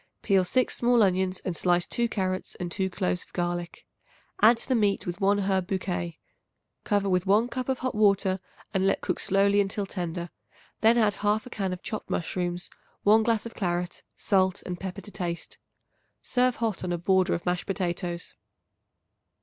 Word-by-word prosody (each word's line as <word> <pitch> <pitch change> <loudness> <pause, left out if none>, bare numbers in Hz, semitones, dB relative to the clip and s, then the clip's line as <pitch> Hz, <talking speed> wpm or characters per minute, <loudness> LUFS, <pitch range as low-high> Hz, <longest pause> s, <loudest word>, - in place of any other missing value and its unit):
Peel 195 -2 +4
6 255 +8 +1
small 240 -1 +4
onions 185 -1 +1
and 180 - -1
slice 175 +1 +2
2 235 -1 -1
carrots 185 -3 -2
and 175 -2 -5
2 190 +1 -1
cloves 180 -1 -1
of - - -14
garlic. 175 -1 -3 0.6
Add 225 +2 +7
to - - -3
the - - +3
meat 205 -4 +2
with 175 +3 -5
1 200 +1 +4
herb 190 -2 0
bouquet. 180 -3 -3 0.7
Cover 205 -2 +1
with 180 0 +1
1 215 +5 +4
cup 255 +1 -4
of 265 - +1
hot 255 0 -2
water 200 -2 +3 0.3
and 190 -1 +2
let - - +1
cook 180 - -2
slowly 200 +1 +3
until 200 +1 -2
tender; 175 -2 -4 0.5
then 225 +2 +5
add 215 -3 +4
1/2 210 +3 0
can 195 -3 -2
of 180 - -6
chopped 215 - -5
mushrooms, 175 +1 -2 0.4
1 215 +2 +6
glass 225 0 +1
of 230 - -7
claret, 175 -2 -2 0.2
salt 190 -1 +1
and 180 -1 -5
pepper 190 +1 -5
to 205 - -9
taste. 175 -4 -5 0.6
Serve 250 -1 +2
hot 220 -6 -2
on 180 - -2
a 175 - 0
border 185 +2 +2
of 170 - -6
mashed 180 0 -1
potatoes. 180 -2 -3
190 Hz, 180 wpm, -27 LUFS, 180-210 Hz, 0.7 s, Add